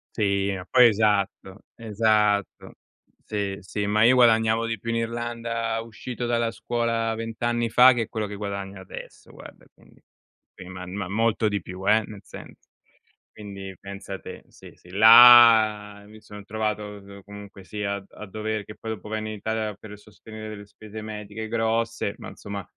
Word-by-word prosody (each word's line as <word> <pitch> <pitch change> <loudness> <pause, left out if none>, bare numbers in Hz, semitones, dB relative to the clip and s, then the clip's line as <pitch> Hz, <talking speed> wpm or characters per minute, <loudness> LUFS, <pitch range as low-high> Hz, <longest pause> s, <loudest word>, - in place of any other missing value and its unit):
Sì, 100 -2 0
ma 90 -1 -8
poi 125 +4 +6
esatto, 105 -2 0
esatto. 105 -2 0 0.5
Sì, 100 -2 -3
sì, 100 +2 -4
ma 105 +1 +1
io 125 +3 +6
guadagnavo 115 -2 +4
di 115 -2 -3
più 115 - -7
in 115 - 0
Irlanda 115 0 -3
uscito 115 +2 -7
dalla 120 -1 0
scuola 115 -1 -2
20 115 0 -6
anni 120 0 0
fa 125 +3 +7
che 115 -3 -2
quello 110 -1 -3
che 105 - -8
guadagno 100 -1 -6
adesso 95 - -11
guarda, - - -14
quindi. - - -23 0.5
Sì 95 - -11
ma 90 0 -8
ma 95 0 -5
molto 110 +2 +1
di 100 -2 -2
più 90 +3 -8
eh, 110 +1 +4
nel 105 -2 -11
senso - - -13 0.7
quindi 100 -2 -9
pensa 100 0 -8
te. - - -10
Sì, - - -15
sì 90 - -20
là 110 -1 +7
mi 110 +1 -15
son 105 -1 -12
trovato, 105 0 -2
uhm, 100 -1 -11
comunque 100 -1 -12
sia 100 +1 -4
a 100 -1 -9
a 105 - -11
dover 110 +1 -4
che 105 - -11
poi 110 - -7
dopo 105 -1 -8
venni 110 0 -4
in - - -6
Italia 110 0 -3
per 105 +1 -12
sostenere 110 +1 -11
delle 105 -1 -9
spese 110 +1 -11
mediche 105 0 -7
grosse, 115 -1 -1
ma - - -9
insomma 100 -1 -8
110 Hz, 170 wpm, -24 LUFS, 100-115 Hz, 0.7 s, fa